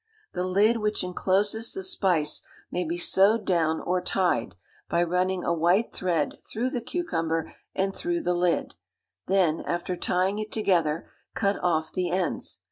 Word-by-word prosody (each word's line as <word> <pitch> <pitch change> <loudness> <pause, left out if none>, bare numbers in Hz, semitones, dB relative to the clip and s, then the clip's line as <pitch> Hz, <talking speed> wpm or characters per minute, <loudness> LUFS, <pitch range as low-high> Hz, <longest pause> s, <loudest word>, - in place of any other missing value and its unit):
The 180 - -2
lid 210 +5 +3
which 210 -2 -1
encloses 200 +5 0
the 385 - -4
spice 185 - +1 0.3
may 180 - -1
be 170 +1 -3
sewed 200 +4 +3
down 160 -3 +2
or 180 +1 0
tied, 175 - 0 0.3
by 170 0 +2
running 180 +1 0
a 170 - +1
white 175 +7 +2
thread 170 -5 -1
through 245 +4 -1
the 250 -4 -2
cucumber 165 - -2 0.2
and 195 0 0
through 345 0 -1
the 180 - +1
lid, 175 -1 +1 0.5
then, 180 -5 +3
after 175 +1 -2
tying 185 +3 0
it 215 0 -5
together, 170 -7 +1 0.2
cut 200 -2 +1
off 160 -3 +1
the 180 -2 0
ends. 180 0 -1
185 Hz, 155 wpm, -26 LUFS, 170-205 Hz, 0.5 s, lid